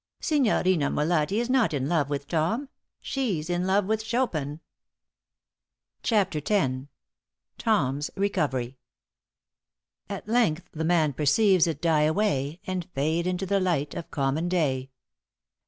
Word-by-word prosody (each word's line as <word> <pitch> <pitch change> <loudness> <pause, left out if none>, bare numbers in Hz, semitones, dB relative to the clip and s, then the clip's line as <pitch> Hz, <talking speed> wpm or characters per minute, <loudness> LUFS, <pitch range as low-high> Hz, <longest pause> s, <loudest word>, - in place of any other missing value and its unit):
"Signorina 185 - +2
Molatti 160 +4 +1
is 240 - -1
not 255 - +2
in 135 -1 -1
love 155 -4 +1
with 145 -1 -3
Tom 180 - -1 0.3
she's 190 - -2
in 175 +1 0
love 195 +1 +3
with 220 +2 -1
Chopin." 160 - -1 1.4
*CHAPTER 195 -8 +1
X.* 135 -10 0 0.7
*TOM'S 145 - +1
RECOVERY.* 135 -10 -1 1.3
At - - -6
length 215 -8 +1
the 160 - -4
man 160 -3 +2
perceives 175 - +3
it 160 -2 -4
die 155 -3 +3
away 160 -4 0
And 185 -2 -4
fade 160 +5 0
into 185 +1 -1
the 200 +1 +1
light 170 -6 0
of 170 - -6
common 145 +5 -1
day. 135 -7 0
170 Hz, 125 wpm, -26 LUFS, 145-200 Hz, 1.4 s, love